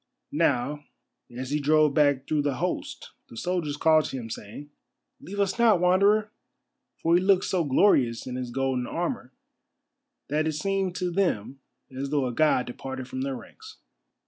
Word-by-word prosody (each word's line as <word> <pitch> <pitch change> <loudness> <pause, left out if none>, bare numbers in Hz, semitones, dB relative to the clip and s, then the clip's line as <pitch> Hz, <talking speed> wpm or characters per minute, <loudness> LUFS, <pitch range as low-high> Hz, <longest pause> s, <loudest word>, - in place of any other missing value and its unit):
Now, 145 +4 0 0.5
as 130 +2 -6
he 150 - +1
drove 150 0 +3
back 145 -2 +2
through 155 -1 +1
the 145 -2 -1
host - - -4 0.2
the 115 - -12
soldiers 170 -2 -2
called 155 0 +4
to 135 - -4
him, 115 -3 -7
saying: 115 +8 -8 0.5
"Leave 200 +2 -8
us 200 +3 0
not, 225 -6 +5
Wanderer." 200 +4 +3 0.7
For 165 - +1
he 175 - +5
looked 190 -1 +3
so 180 -3 0
glorious 130 - +3
in 125 - -6
his 125 -1 -4
golden 130 -1 -1
armour - - -3 1.0
that 155 +2 0
it 160 - -1
seemed 190 +3 -1
to 180 -1 -2
them 140 - -1 0.4
as 135 +1 -4
though 145 -2 +1
a 125 - -3
god 150 -3 +2
departed 130 +1 -7
from 130 0 -5
their 135 0 -2
ranks. 435 - -12
150 Hz, 170 wpm, -26 LUFS, 130-180 Hz, 1.0 s, not